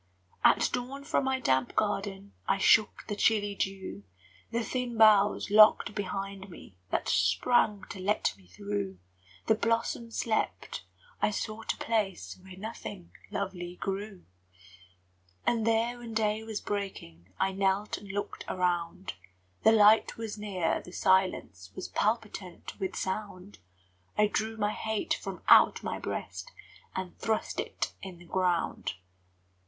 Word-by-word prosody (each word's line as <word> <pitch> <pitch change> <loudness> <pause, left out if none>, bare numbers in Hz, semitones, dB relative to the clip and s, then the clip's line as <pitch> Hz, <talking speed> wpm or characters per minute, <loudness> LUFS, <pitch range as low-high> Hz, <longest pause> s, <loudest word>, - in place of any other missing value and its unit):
At - - +5
dawn 260 +3 -3
from 280 -2 0
my 265 0 +1
damp 130 - +1
garden 200 -1 -1
I - - +3
shook 210 +2 +4
the 205 - -2
chilly 205 -1 +2
dew; 190 - -4 0.5
The 235 0 -1
thin 245 -1 -3
boughs 210 -2 +5
locked 215 0 +7
behind 195 -1 -4
me 135 - -13
That - - -1
sprang 200 - +3
to 195 - -7
let 200 +3 +1
me 95 -2 -21
through; 100 +1 -4 0.5
The - - +5
blossoms 230 +1 -1
slept, 220 -2 -1 0.4
I - - +4
sought 215 +1 -3
a - - -20
place 210 -5 -1
Where 185 0 -12
nothing 205 -3 -7 0.2
lovely 180 -3 -4
grew. 195 0 -5 1.2
And 230 -2 +1
there, 230 +2 +1
when 230 -2 -8
day 215 0 +1
was 220 -2 -5
breaking, 95 - -5
I 195 - +2
knelt 195 +2 0
and 200 -1 -9
looked 205 +1 -4
around: 180 0 -1 0.5
The 220 - +6
light 215 0 +5
was 225 -2 -4
near, 195 -6 -1
the 180 - -12
silence 185 - +1
Was - - -5
palpitant 210 -5 -2
with 190 -2 -3
sound; 190 0 -4 0.6
I 210 - +5
drew 220 +1 -1
my 210 -1 +1
hate 220 +6 -1
from - - -6
out - - +7
my - - -3
breast - - -5 0.4
And 185 -1 -4
thrust 220 -1 -1
it - - -3
in 190 -2 -8
the 175 - -15
ground. 175 - 0
205 Hz, 140 wpm, -30 LUFS, 185-220 Hz, 1.2 s, locked